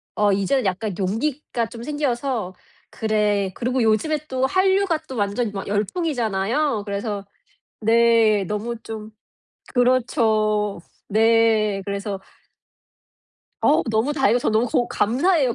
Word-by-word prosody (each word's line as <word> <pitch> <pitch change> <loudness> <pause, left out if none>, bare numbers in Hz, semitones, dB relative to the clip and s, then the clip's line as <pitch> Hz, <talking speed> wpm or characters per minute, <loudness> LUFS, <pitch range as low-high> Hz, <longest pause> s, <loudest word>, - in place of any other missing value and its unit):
어 210 -1 +3
이제는 200 +6 +1
약간 195 +2 -1
용기가 235 +5 -2
좀 230 0 -9
생겨서 255 -8 -2 0.4
'그래' 210 -3 0
그리고 250 +1 -1
요즘에 225 +8 +2
또 260 -1 0
한류가 375 +1 +2
또 260 - -7
완전 205 +2 -1
막 195 -1 -6
열풍이잖아요. 220 - -1
그래서 200 0 -4 0.6
네. 225 -2 +4
너무 210 +5 -3
좀 220 -1 -7 0.6
그렇죠. 220 -5 +2 0.3
네. 220 -2 +3
그래서 200 0 -4 1.5
어우 - - +4
너무 225 +7 +1
다행이고 270 -5 +3
저 - - 0
너무 220 +3 +2
고 240 +1 0
감사해요. 265 - +2
225 Hz, 250 characters per minute, -22 LUFS, 205-255 Hz, 1.5 s, 네